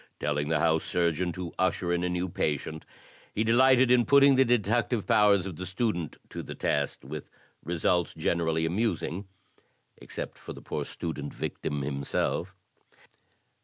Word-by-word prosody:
Telling 75 0 -1
the 80 +1 +2
House 80 0 +2
Surgeon 85 0 0
to 90 -3 -6
usher 90 -1 +1
in 85 0 0
a 90 - 0
new 90 +1 -1
patient, 80 -2 -3 0.5
he 110 - +1
delighted 130 +2 +5
in 125 -1 +5
putting 140 +3 +6
the 135 0 +5
deductive 120 -1 +1
powers 100 -3 +4
of 90 -5 -6
the 95 - -5
student 95 -5 -2
to - - -6
the - - -8
test, 70 -2 -1
with 75 +2 -7 0.3
results 85 +1 0
generally 80 -1 0
amusing, 95 0 -1 0.7
except - - -8
to - - -7
the - - -11
poor - - -3
student 75 -4 -5
victim 75 -1 -3
himself." 75 +6 -2
90 Hz, 150 wpm, -28 LUFS, 80-110 Hz, 0.7 s, putting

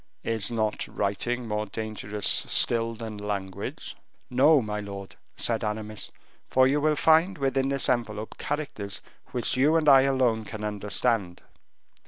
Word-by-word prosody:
"Is 110 -3 +1
not 110 -2 -1
writing 115 +5 -2
more 105 0 -2
dangerous 105 -1 -4
still 115 -1 +3
than 110 -2 -7
language?" 100 -2 -5 0.4
"No, 140 +5 +5
my 105 -3 -3
lord," 100 -1 -8 0.2
said 115 -2 -1
Aramis, 105 0 -4 0.4
"for 130 0 +4
you 140 +3 +2
will 155 0 +2
find 160 +5 +4
within 135 -1 0
this 140 -1 +1
envelope 110 -4 -2
characters 140 -9 -4 0.3
which 125 0 -1
you 145 +5 +3
and 160 -2 +2
I 135 -2 +8
alone 130 -5 +1
can 105 0 -7
understand." 105 -2 -1
115 Hz, 140 wpm, -27 LUFS, 105-135 Hz, 0.4 s, I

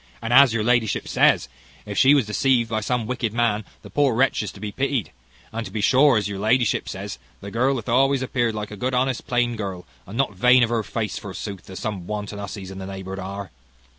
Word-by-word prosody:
And, 115 - -2
as 135 -1 +8
your 110 -1 0
ladyship 120 -2 +1
says, - - +3 0.4
if 105 -1 -6
she 135 +8 +6
was 135 -5 +3
deceived 115 +2 +1
by 110 - +1
some 120 +1 -1
wicked 115 -2 -2
man, 115 -3 +1 0.2
the - - -12
poor 140 -5 +2
wretch 130 0 +2
is 105 -3 -4
to - - -13
be 105 0 -5
pitied. 135 -2 -1 0.4
And 115 +1 -3
to 95 - -8
be 110 - -3
sure, 130 +4 +5
as 105 -2 0
your 100 -1 -5
ladyship 115 +3 +1
says, - - -6 0.2
the 100 - -8
girl 130 +5 +2
hath 115 -3 -5
always 135 +2 +3
appeared 120 -3 0
like 105 -1 -5
a 105 - -7
good, 125 +5 -1
honest, 130 0 0
plain 120 -1 +1
girl, 95 -5 -5 0.2
and 100 +5 -7
not 135 -6 +1
vain 125 +6 +5
of 115 - 0
her 115 -1 +1
face, 105 0 -3
forsooth, 100 -1 -7
as 95 - -8
some 100 -5 -4
wanton 105 -1 -4
husseys 100 -1 -7
in 95 - -8
the 95 - -6
neighbourhood 95 0 -6
are." 95 -1 -6
110 Hz, 230 wpm, -23 LUFS, 100-125 Hz, 0.4 s, as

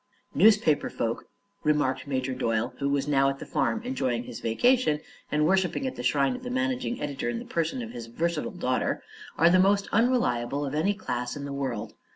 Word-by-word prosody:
"Newspaper 200 -3 +4
folk," 115 0 -3 0.4
remarked 145 -4 +1
Major 130 -1 -1
Doyle, 115 -1 -1
who 140 0 0
was 140 0 0
now 135 -2 +3
at 135 - -3
the - - -8
farm 225 - 0
enjoying 130 - -1
his - - -8
vacation 155 - +2 0.3
and 150 0 +2
worshipping 190 - +1
at 260 - -3
the - - -5
shrine 140 - +2
of 250 - -8
the 250 - -6
managing 260 -1 -1
editor 140 -4 -3
in 120 - -2
the - - -6
person 170 +10 -2
of 230 - -7
his 115 -1 -7
versatile 165 +6 -1
daughter, 130 -9 -1 0.3
"are 170 +2 +5
the 185 - +5
most 200 +1 +3
unreliable 145 - +1
of 135 - -4
any 190 +7 +1
class 125 - -3
in 145 -1 -5
the 140 - -5
world. 130 -6 -3
150 Hz, 195 wpm, -27 LUFS, 130-205 Hz, 0.4 s, are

